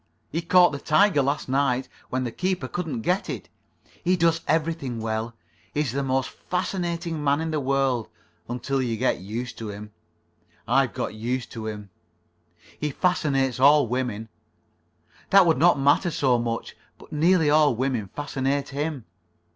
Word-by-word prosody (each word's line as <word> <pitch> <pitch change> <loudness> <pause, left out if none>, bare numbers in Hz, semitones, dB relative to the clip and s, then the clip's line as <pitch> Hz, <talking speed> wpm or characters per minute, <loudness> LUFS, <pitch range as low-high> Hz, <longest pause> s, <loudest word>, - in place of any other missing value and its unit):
"He 165 - -1
caught 175 +1 +5
the 140 - -5
tiger 160 +1 +3
last 140 +2 -1
night. 135 -1 +1 0.2
When 130 0 -1
the 120 - -3
keeper 185 +6 -2
couldn't 160 -10 -4
get 180 - 0
it. - - -6 0.5
He 180 +1 +2
does 165 -1 +2
everything 155 -6 -1
well. 110 +1 -3 0.4
He 150 - +2
is 140 -6 -1
the 140 +3 -1
most 130 -1 -1
fascinating 170 -3 -3
man 140 0 +2
in 160 0 -2
the 155 - 0
world—until 135 -1 -2
you 115 -3 -1
get 130 -4 +1
used 115 +6 -6
to 110 -2 -5
him. 105 +1 -8 0.8
I've - - +2
got - - -3
used 120 +3 -3
to 110 -2 -6
him. 105 -2 -7 0.9
He 150 - -1
fascinates 135 -6 0
all 145 0 +6
women. 115 -3 -3 1.0
That 195 -1 +7
would 165 -2 +3
not 175 -3 +5
matter 145 +6 +3
so 130 -6 +2
much, 115 -1 -3 0.2
but - - -16
nearly 160 0 +3
all 150 -4 +4
women 125 -4 -1
fascinate 140 +2 -2
him. 145 -2 -3
140 Hz, 155 wpm, -25 LUFS, 120-160 Hz, 1.0 s, That